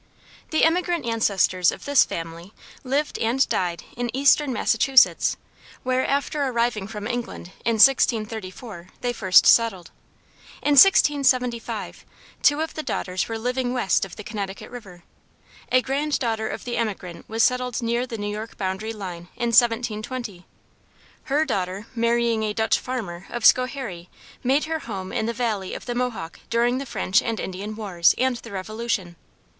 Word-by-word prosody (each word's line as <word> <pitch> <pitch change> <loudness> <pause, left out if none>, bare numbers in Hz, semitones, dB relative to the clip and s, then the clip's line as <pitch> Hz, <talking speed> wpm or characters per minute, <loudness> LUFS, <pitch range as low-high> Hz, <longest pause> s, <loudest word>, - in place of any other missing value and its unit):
The 315 - +1
emigrant 345 -2 +1
ancestors 195 -6 +2
of - - -10
this 285 -2 +5
family 165 +4 -7 0.3
lived 280 +3 -1
and 240 +4 +2
died 175 -2 -1
in 245 0 -3
eastern 280 +1 +4
Massachusetts, 250 +3 +3 0.5
where 255 0 +1
after 285 +1 -1
arriving 235 -6 0
from 210 -1 -7
England, 240 -6 -5
in 230 - +1
1634, 220 -5 +2
they 245 -1 -1
first 190 -5 +5
settled. 220 -7 +3 0.7
In 295 - +2
1675, 270 -7 +3 0.4
two 290 +1 +4
of 320 - -3
the 310 - -4
daughters 185 -10 -3
were 225 - -3
living 250 +2 -2
west 240 -8 +1
of 195 -2 -6
the 210 - -9
Connecticut 200 -1 -6
river. 195 -8 -11 0.7
A 255 0 +4
grand 285 +3 -1
daughter 225 -3 -2
of - - -6
the 245 - -3
emigrant 195 -6 -4
was 225 +1 +1
settled 250 -1 +1
near 235 +2 0
the 230 - -6
New 205 - -4
York 215 +2 -7
boundary 195 +3 -3
line 180 -5 -7
in 240 -1 -1
1720. 230 -3 0 0.8
Her 295 +3 +1
daughter 195 -5 -3
marrying 235 -1 +1
a 215 -1 -1
Dutch 220 +1 +1
farmer 195 -9 -5
of 240 -2 -3
Schoharie 255 -10 +2 0.3
made 270 +4 +2
her 320 0 -2
home 190 -8 -6
in 220 - -1
the - - 0
valley 220 -5 -2
of - - -8
the 245 - -3
Mohawk 240 -9 -4
during 240 +2 +1
the 275 - -6
French 225 0 +1
and 230 -2 -3
Indian 200 +3 -5
wars 190 -6 +2
and 255 -1 +1
the 230 -1 -11
Revolution. 200 -2 -3
230 Hz, 155 wpm, -23 LUFS, 200-255 Hz, 0.8 s, this